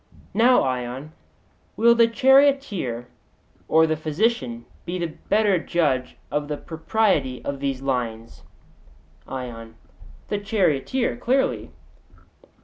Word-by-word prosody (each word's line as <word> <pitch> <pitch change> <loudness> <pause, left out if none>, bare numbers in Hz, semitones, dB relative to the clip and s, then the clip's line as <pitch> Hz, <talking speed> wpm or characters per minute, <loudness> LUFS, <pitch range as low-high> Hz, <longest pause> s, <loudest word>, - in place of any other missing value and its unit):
Now, 245 +2 +5
Ion, 130 +3 -3 0.7
will 235 +1 +6
the 230 0 +5
charioteer 260 - +3 0.6
or 160 0 +5
the 160 0 0
physician 155 - -1 0.2
be 180 +2 -4
the 170 -3 -4
better 205 -3 +3
judge 145 -7 -1
of 150 0 -1
the 150 0 -3
propriety 160 - -1
of 140 -1 -3
these 135 -1 -3
lines? 115 -4 -3 0.9
ION: 115 -3 -7 0.5
The 205 - -1
charioteer, 205 - 0
clearly. 255 +2 0
155 Hz, 105 wpm, -23 LUFS, -, 0.9 s, will